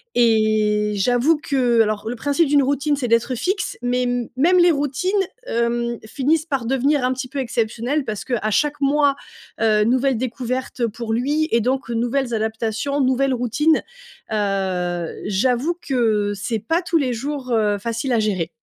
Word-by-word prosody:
et 215 -2 +2
j'avoue 245 +9 +2
que 250 -5 +2
alors, 215 -1 -1
le 245 - -3
principe 285 +6 +1
d'une 285 0 +4
routine 285 +2 +1
c'est 270 -3 -3
d'être 230 +2 +1
fixe 385 - -2
mais, 245 0 0 0.3
même 345 +7 +4
les 350 0 +6
routines, 290 +4 -1 0.4
hem, 235 0 -1
finissent 290 +7 0
par 275 -7 -2
devenir 270 +3 +1
un 255 +1 +1
petit 260 0 -5
peu 275 +2 -5
exceptionnelles, 240 +3 -1
parce 215 -3 -4
que 260 - -4
à 215 - -1
chaque 295 +6 +1
mois, 285 0 +3 0.5
heu, 215 -1 +3
nouvelle 255 +2 +2
découverte 255 +1 -3
pour 225 +1 -5
lui 290 +7 0
et 230 - +4
donc 255 +2 -1
nouvelles 240 +2 -1
adaptations, 225 +5 -1
nouvelles 260 +1 +2
routines. 250 +6 +2 0.5
Heu, 190 -4 -1 0.2
j'avoue 250 - +1
que, 220 -6 +1
c'est 220 +3 -3
pas 325 - 0
tous 345 -1 0
les 265 -5 0
jours, 265 +1 -4
heu, 210 -3 +2
facile 230 +4 -2
à 230 - +3
gérer. 190 -6 -1
245 Hz, 165 wpm, -21 LUFS, 220-280 Hz, 0.5 s, les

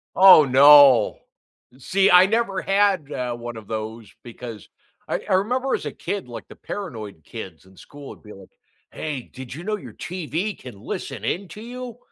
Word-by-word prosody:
Oh 185 -5 +8
no! 140 -1 +6 0.6
See, 195 +8 +2
I 180 +1 +8
never 200 -2 -1
had, 195 -6 +1
uh, 125 -3 -3
one 120 -1 -8
of 110 -2 -11
those 110 0 -6
because 115 -3 -10 0.4
I - - -2
I - - +2
remember 250 +7 0
as - - -6
a - - -4
kid, 200 -7 -5
like, 120 - -9
the - - -14
paranoid 110 - -8
kids 95 -3 -10
in 95 0 -20
school 145 -1 -12
would - - -13
be 105 - -12
like, 95 -1 -15 0.4
"Hey, 150 -4 -5
did 130 -1 -9
you 160 +5 -9
know 215 +2 -2
your - - -12
TV 180 +3 -4
can 120 -6 -12
listen 110 +2 -6
in 190 +10 -2
to 210 - -11
you?" 245 0 -8
145 Hz, 185 wpm, -22 LUFS, 115-195 Hz, 0.6 s, Oh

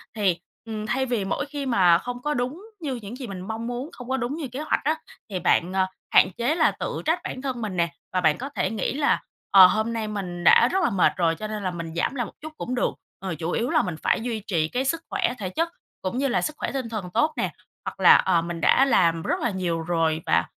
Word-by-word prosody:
Thì, 190 -5 +1 0.3
ừm, 215 -2 -4
thay 265 +4 0
vì 240 -6 -1
mỗi 195 - -1
khi 285 -1 -5
mà 185 -9 +5
không 245 +6 -6
có 295 +3 -1
đúng 255 +7 -2 0.2
như 280 -5 -2
những 225 -1 -7
gì 255 -2 -6
mình 190 -3 -6
mong 220 +4 -4
muốn, 245 +4 -4
không 245 +1 -10
có 265 - +1
đúng 255 +2 -2
như 315 -4 -4
kế 255 +2 -7
hoạch 310 - 0
á 310 +3 +2 0.3
thì 190 -3 -3
bạn, 180 +1 +2
à, 190 -1 +2 0.3
hạn - - +7
chế 245 +7 +1
là 330 - +4
tự - - -4
trách 325 +3 +2
bản 255 - -5
thân 260 -3 -3
mình 205 -5 -3
nè 170 -1 +2 0.2
và 185 - +1
bạn 160 -3 +3
có 270 +3 -5
thể 275 - -1
nghĩ 215 -4 -1
là, 285 +1 +2 0.3
ờ, 190 -2 +10
hôm 220 +4 0
nay 225 -2 -2
mình 185 -4 -5
đã - - +7
rất 380 0 +1
là - - +3
mệt 195 -6 +3
rồi 165 -2 +2
cho 215 +5 -5
nên 215 -1 -5
là 185 - -1
mình 170 -2 -6
giảm 175 +10 0
lại 245 -3 -1
một - - -11
chút 310 +1 -8
cũng 250 - -3
được, 245 - +1 0.3
ờ, 190 -3 -4
chủ 165 +1 -2
yếu 235 +6 0
là - - +4
mình 180 -4 -3
phải - - +2
duy 230 -2 -2
trì 165 -6 +1
cái 250 +10 -2
sức 325 +5 0
khỏe 385 -9 0
thể 190 -3 -3
chất 330 - -1 0.3
cũng 190 +6 -3
như 275 +1 +1
là 250 - +1
sức 305 - -2
khỏe - - -3
tinh 260 -4 -3
thần 210 -5 -4
tốt 310 0 +2
nè, - - 0 0.3
hoặc - - -6
là, - - +8
ờ, 175 -3 +3
mình 170 0 -5
đã 270 - +5
làm 170 -10 +3
rất - - 0
là 240 - +1
nhiều 175 -3 -1
rồi 160 -1 0
và 85 - +3
220 Hz, 270 wpm, -25 LUFS, 180-260 Hz, 0.3 s, ờ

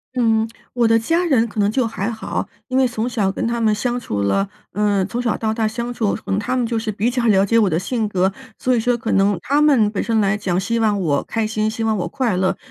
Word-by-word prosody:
嗯， 225 -2 +2 0.3
我 240 -2 +2
的 225 0 +4
家 330 +10 +1
人 250 -9 +2
可 210 - -6
能 200 0 +3
就 255 0 +1
还 220 -1 -3
好， 220 -1 -4 0.2
因 255 - -4
为 260 - +4
从 235 0 -3
小 205 -6 0
跟 - - -3
他 235 0 -1
们 215 -1 +3
相 245 +3 -1
处 105 - -3
了， 195 - +1 0.2
嗯， 205 -2 +1
从 240 +3 -3
小 235 -3 0
到 220 -1 -1
大 220 -1 0
相 235 +2 -4
处， 220 -4 0
可 - - -7
能 195 - +1
他 255 +5 -1
们 245 - +1
就 230 -1 -1
是 220 -1 -3
比 220 +4 0
较 240 -2 0
了 195 -2 +4
解 230 +3 +3
我 205 -4 +3
的 160 - 0
性 215 +3 -2
格。 190 0 +1 0.2
所 255 -1 +1
以 - - +2
说 245 +1 +1
可 225 - -3
能 195 -1 +3
他 285 +2 +2
们 250 -9 +4
本 205 - -2
身 225 -1 +1
来 205 0 +2
讲， 185 -3 -1
希 230 +4 -1
望 210 -3 +2
我 145 -6 0
开 225 -1 -2
心， 215 0 -1
希 225 0 -4
望 220 -1 +1
我 180 - -2
快 250 -8 -1
乐， 185 0 +1
220 Hz, 295 characters per minute, -20 LUFS, 200-235 Hz, 0.3 s, 的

